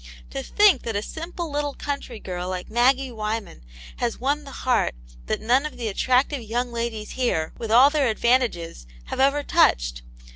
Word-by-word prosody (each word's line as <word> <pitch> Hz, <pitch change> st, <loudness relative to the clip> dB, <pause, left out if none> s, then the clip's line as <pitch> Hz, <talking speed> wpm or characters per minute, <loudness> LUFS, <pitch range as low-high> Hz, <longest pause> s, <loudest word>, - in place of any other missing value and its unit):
To -, -, -3 dB
think 400 Hz, -, +4 dB
that 225 Hz, -2 st, -4 dB
a 205 Hz, -, -1 dB
simple 335 Hz, +2 st, -6 dB
little 290 Hz, -1 st, -2 dB
country 280 Hz, -5 st, -5 dB
girl 180 Hz, -2 st, -5 dB
like 185 Hz, -1 st, -5 dB
Maggie 255 Hz, +3 st, +3 dB
Wyman 215 Hz, -, -4 dB, 0.4 s
has 240 Hz, -2 st, -2 dB
won 285 Hz, +3 st, -1 dB
the 275 Hz, -, -9 dB
heart 250 Hz, -, +2 dB, 0.3 s
that -, -, -1 dB
none 245 Hz, +5 st, +2 dB
of 300 Hz, -, -6 dB
the 230 Hz, -3 st, -2 dB
attractive 255 Hz, +6 st, +1 dB
young 240 Hz, +2 st, -2 dB
ladies 230 Hz, -2 st, -4 dB
here, 200 Hz, -12 st, -1 dB
with 225 Hz, -, -4 dB
all 250 Hz, +6 st, +7 dB
their 290 Hz, -3 st, +2 dB
advantages, 220 Hz, -, 0 dB, 0.2 s
have -, -, -5 dB
ever 280 Hz, +2 st, +3 dB
touched! -, -, +2 dB
240 Hz, 175 wpm, -24 LUFS, 215-275 Hz, 0.4 s, all